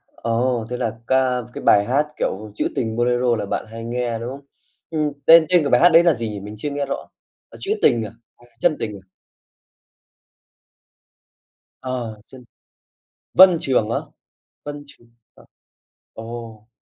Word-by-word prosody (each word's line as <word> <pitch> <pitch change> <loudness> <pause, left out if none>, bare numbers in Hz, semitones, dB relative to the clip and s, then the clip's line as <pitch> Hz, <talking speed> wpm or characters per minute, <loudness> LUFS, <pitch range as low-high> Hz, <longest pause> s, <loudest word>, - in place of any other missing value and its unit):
Ồ, 115 0 -1
thế 125 - -3
là 115 -2 -3
ca 130 -1 +2
cái - - -7
bài 100 0 +5
hát, 140 +6 +1
kiểu, 105 +2 -3
chữ - - 0
tình 110 -2 -2
bolero 120 0 +1
là 105 -2 -3
bạn - - -3
hay 115 0 -7
nghe, 120 -1 -2
đúng 120 +2 -5
hông? 140 +1 -9 0.4
Ừm, 155 -2 -1
tên 165 0 +8
tên 175 -3 +4
của 140 - -1
bài 125 - +4
hát 175 - +8
đấy 165 0 +6
là 170 -2 +4
gì 115 -4 -4
nhỉ? 105 - -6
Mình 105 +2 -9
chưa 145 +7 -4
nghe 145 0 -2
rõ, 140 - -5 0.4
ờ, - - -14
"Trữ 395 - -2
tình" 115 -1 +3
à, 105 - -8 0.3
à, 120 - -21
"Chân 160 -3 +2
tình" 105 -2 -4
à? 95 - -38 2.7
Ờ, 120 -4 -5
chân 130 -1 -14 0.9
Vân 185 -2 +8
Trường 125 -7 0
á? 115 - 0 0.7
Vân 145 0 -7
Trường, 120 -4 -18 0.3
ờ. - - -19 0.7
Ồ, 115 -1 -9
120 Hz, 170 wpm, -21 LUFS, 115-140 Hz, 2.7 s, tên